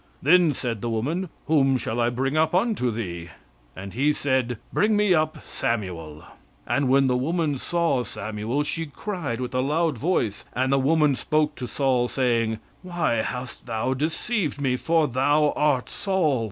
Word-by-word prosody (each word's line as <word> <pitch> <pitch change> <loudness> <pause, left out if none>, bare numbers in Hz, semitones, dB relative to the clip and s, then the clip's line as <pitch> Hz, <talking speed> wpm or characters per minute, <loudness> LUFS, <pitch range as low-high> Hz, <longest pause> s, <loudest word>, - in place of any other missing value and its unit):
"Then 170 +2 +5
said 115 -5 -3
the 120 - -2
woman, 150 +12 -2 0.2
Whom 135 -4 +3
shall 115 -1 -3
I 120 0 +3
bring 135 +4 -1
up 160 +2 +2
unto 195 - +1
thee? 90 -7 -5 0.5
And 95 0 -8
he 145 +5 +2
said, 130 -4 0 0.2
Bring 215 +1 +3
me 210 -3 +4
up 155 -1 0
Samuel. 85 -9 -3 0.4
"And 140 -2 +1
when 135 +1 +4
the 125 -1 +2
woman 150 +1 0
saw 170 -6 +1
Samuel, 110 +5 -3
she 165 +2 -2
cried 145 - -4
with 125 0 -4
a 130 - +1
loud 150 0 0
voice; 120 - 0
and 130 +2 +1
the 135 - +4
woman 150 0 +3
spake 150 +5 0
to 125 - -5
Saul, 130 -2 +1
saying, 115 -4 0 0.2
Why 170 -9 -1
hast 125 +3 -4
thou 115 +3 -1
deceived 155 - -1
me? 135 -3 +1
for 160 +3 +2
thou 145 +4 +2
art 145 -4 +1
Saul. 180 -10 0
135 Hz, 165 wpm, -24 LUFS, 120-155 Hz, 0.5 s, Then